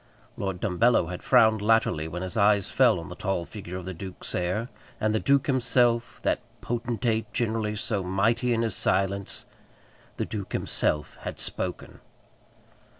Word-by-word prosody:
Lord 95 -2 -3
Dumbello 100 -2 +2
had 90 - -5
frowned 110 -1 +5
latterly 105 -8 +2
when 90 +3 -5
his 95 - -5
eyes 100 -2 +3
fell - - +4
on - - -8
the - - -6
tall 95 -3 -2
figure 90 -3 -7
of 90 - -7
the 95 - -4
duke's 95 +2 -7
heir; 95 +6 -1 0.3
and 110 0 +1
the 110 - +2
duke 140 +2 +3
himself, 120 -2 +2
that - - +2 0.2
potentate, 115 -1 -1
generally 110 -2 0
so 105 -1 -1
mighty 100 +7 +1
in 115 -1 +2
his 115 - -1
silence, 100 0 0 0.7
the - - -1
duke 100 -4 -6
himself 75 0 -1
had - - -5
spoken. - - -5
105 Hz, 155 wpm, -27 LUFS, 95-115 Hz, 0.7 s, frowned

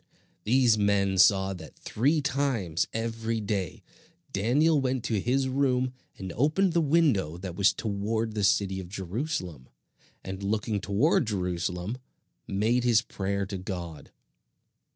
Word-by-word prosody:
These 120 -2 +4
men 100 -2 +2
saw 95 0 +5
that 90 - -11
three 145 +8 +1
times 120 - 0
every 115 0 -2
day 100 -5 -3 0.5
Daniel 140 +10 +3
went 130 -2 -1
to 110 -3 0
his 130 +6 +1
room 130 -1 +1 0.2
and 95 -2 -6
opened 160 - +2
the 170 - +3
window 140 - +2
that 90 -1 -7
was 100 +2 +4
toward 110 +1 -2
the 105 -1 -2
city 95 0 +2
of 90 -2 -8
Jerusalem, 95 - -4 0.5
and 95 +1 -6
looking 105 0 -1
toward 110 - +2
Jerusalem, 90 +2 -2 0.5
made 110 +5 +1
his 120 -2 +4
prayer 100 -2 -2
to 95 -1 -5
God. 90 -4 -6
105 Hz, 130 wpm, -27 LUFS, 95-125 Hz, 0.5 s, saw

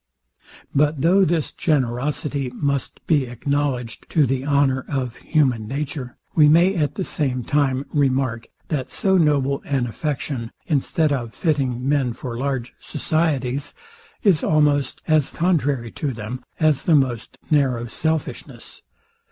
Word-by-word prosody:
But 145 0 +2
though 185 +5 +5
this 165 -3 0
generosity 140 -1 -1
must 140 -1 -2
be 145 -6 +2
acknowledged 125 -1 -2
to 155 -3 +3
the 130 0 -1
honour 140 -2 +2
of 130 -4 -2
human 130 -9 +1
nature, 140 -1 -4 0.2
we 150 -2 +6
may 170 +5 +5
at 150 -4 0
the 190 - -2
same 130 -7 -1
time 140 0 +1
remark, 130 -5 +1 0.2
that 140 -5 -2
so 190 -1 +1
noble 145 -5 +2
an 135 -3 0
affection, 130 -1 -3 0.2
instead 150 +1 +1
of 120 -4 -4
fitting 135 -6 0
men 135 -4 +1
for 120 0 -6
large 130 -1 -2
societies, 145 -4 -1 0.5
is 190 -9 +4
almost 145 -3 +2
as 155 -3 +3
contrary 145 -9 0
to 140 -3 -3
them, 115 +3 -6 0.2
as 155 -4 +3
the 165 - +3
most 125 -5 0
narrow 130 -6 +2
selfishness. 160 +5 -4
140 Hz, 135 wpm, -22 LUFS, 125-150 Hz, 0.5 s, we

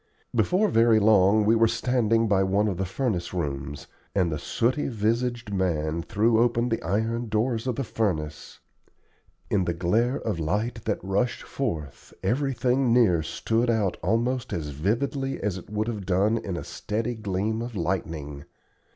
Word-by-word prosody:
Before 195 +4 +2
very 115 -5 +5
long 105 0 +5
we 110 +2 +4
were 115 0 +5
standing 115 -1 +1
by 100 -2 +3
one 100 +2 +2
of 95 -4 -2
the 95 - -1
furnace 95 -5 -2
rooms, 70 -4 -4 0.3
and 90 -4 +2
the 75 - -2
sooty 125 - 0
visaged 115 0 -1
man 85 -4 0
threw 110 +6 +2
open 120 0 +2
the 115 - -1
iron 110 +6 -1
doors 115 +2 0
of 125 - 0
the 135 - -2
furnace. 80 - -3 0.9
In 95 -3 +2
the 85 - -1
glare 110 +9 +1
of 105 -7 -3
light 105 +8 -2
that 105 -2 0
rushed 100 +5 -1
forth 80 - -5
everything 130 -1 +1
near 110 -9 +4
stood 115 +9 -1
out 110 -5 +1
almost 120 +5 0
as 75 -3 -3
vividly 125 - -1
as 100 -2 -2
it - - -15
would 105 +1 -1
have 105 -5 -4
done 100 +5 +2
in 95 -5 -4
a - - -5
steady 115 +3 -3
gleam 110 +1 -2
of 120 -1 -6
lightning. 80 -5 -3
110 Hz, 160 wpm, -26 LUFS, 90-115 Hz, 0.9 s, very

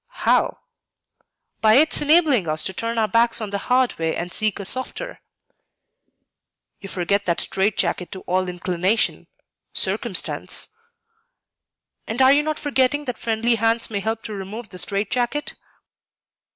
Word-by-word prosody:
"How?" - - +3 1.0
"By 220 0 +5
its 305 +4 +4
enabling 295 - +4
us 155 0 0
to 190 - -3
turn 230 +4 -3
our 220 -1 +2
backs 230 +1 +2
on 215 -3 -5
the 200 - -2
hard 250 0 +1
way 160 0 -1
and 175 +1 -4
seek 215 0 0
a 200 - -5
softer." 260 - -1 1.6
"You 195 - -9
forget 200 +2 -1
that 170 - +1
strait 195 +2 0
jacket 180 - -1
to 190 - -7
all 185 0 -1
inclination, 180 +4 0 0.5
circumstance." - - -1 1.4
"And 225 +3 -3
are 265 +1 +7
you 290 - +4
not 310 0 -2
forgetting 290 0 +1
that 250 -4 -4
friendly 230 +1 +1
hands 230 +1 +1
may 205 - -1
help 220 +2 -3
to 215 - -6
remove 205 +3 -7
the 185 - -9
strait 200 +4 -3
jacket?" 250 +4 -1
220 Hz, 150 wpm, -22 LUFS, 190-250 Hz, 1.6 s, are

